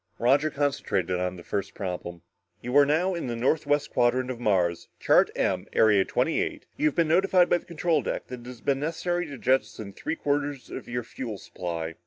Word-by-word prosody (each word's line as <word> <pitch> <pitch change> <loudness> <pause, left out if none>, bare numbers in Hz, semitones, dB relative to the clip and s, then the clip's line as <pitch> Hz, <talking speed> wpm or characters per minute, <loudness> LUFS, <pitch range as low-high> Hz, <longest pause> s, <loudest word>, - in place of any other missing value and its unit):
Roger 140 +6 +3
concentrated 115 - -1
on 90 0 -2
the 85 - -11
first 100 +1 -3
problem. 90 -3 -5 0.2
"... 90 0 -46
you 125 +2 -3
are 145 -1 +7
now 175 +6 +2
in 170 -6 -3
the 120 - -2
northwest 145 +4 +1
quadrant 125 +1 +2
of 120 - -6
Mars, 90 -7 +1
chart - - +4
M, - - 0
area 105 -3 +5
twenty - - +1
eight. - - -4
You 155 - +2
have 150 - -1
been 170 -2 +3
notified 180 +2 +4
by 175 - +3
the - - -20
control 170 -2 +1
deck - - -3
that 125 -1 -8
it 120 - -14
has 125 -2 -9
been 135 -1 +1
necessary 175 +3 -2
to 140 -2 -8
jettison 120 -5 0
three 160 - -3
quarters 145 -3 -2
of - - -7
your 120 0 -2
fuel 115 -2 -6
supply. 85 -3 -5
125 Hz, 210 wpm, -27 LUFS, 100-150 Hz, 0.2 s, are